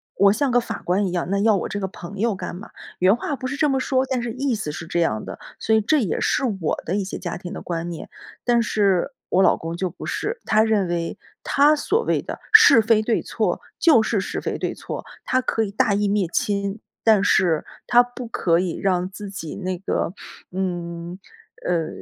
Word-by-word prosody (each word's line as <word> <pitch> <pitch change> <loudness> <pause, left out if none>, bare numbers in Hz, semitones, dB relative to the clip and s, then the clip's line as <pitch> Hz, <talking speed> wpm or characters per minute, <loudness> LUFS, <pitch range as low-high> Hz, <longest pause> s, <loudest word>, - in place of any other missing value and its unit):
我 200 0 +5
像 265 +4 0
个 245 - +4
法 230 -2 -5
官 190 +3 +1
一 - - -3
样， 175 -1 -1
那 200 +1 +1
要 215 +1 +4
我 190 - -2
这 205 - -3
个 190 - -2
朋 190 +1 -9
友 225 -1 +1
干 185 - -6
嘛， 200 +5 -10 0.3
原 185 +3 +5
话 285 +5 -3
不 255 - -4
是 275 - -3
这 295 +1 +2
么 270 -1 +1
说， 260 0 +1
但 260 -2 0
是 235 -1 -4
意 265 +1 -1
思 210 -9 -3
是 160 - -6
这 170 +1 -1
样 110 -11 0
的， - - -8 0.2
所 220 - +1
以 220 - +6
这 300 +9 +2
也 195 -9 -1
是 - - +1 0.2
我 155 - -1
的 175 - -1
一 200 -1 -1
些 190 - -5
家 175 -2 -5
庭 175 0 -8
的 - - -6
观 170 0 -4
念。 170 - -7 0.3
但 240 -1 +3
是 205 +1 +1 0.2
我 185 - +3
老 - - +5
公 165 +1 -6
就 185 0 -1
不 180 - -10
是， 460 +3 -3
他 215 - +4
认 215 -4 +2
为 170 -1 -2 0.2
他 290 +2 +4
所 415 +10 0
谓 - - +1
的 - - -6
是 440 - +9
非 220 0 +3
对 225 +1 0
错， - - -1 0.2
就 290 -11 +5
是 215 -1 0
是 190 - -3
非 - - -3
对 - - -2
错， - - -7 0.2
他 255 - +1
可 225 -3 0
以 200 - -4
大 215 0 +2
义 205 0 +1
灭 200 -3 +1
亲， 200 0 -1 0.3
但 215 -3 +5
是 175 -6 +3 0.2
他 245 0 +6
不 245 0 -8
可 170 -6 +1
以 180 -2 -2
让 185 -2 0
自 200 +1 -8
己 165 -5 -6
那 185 -1 -3
个， 175 -1 -2 0.4
嗯， 175 -2 -4 0.5
呃， 170 -3 0
200 Hz, 245 characters per minute, -22 LUFS, 180-235 Hz, 0.5 s, 是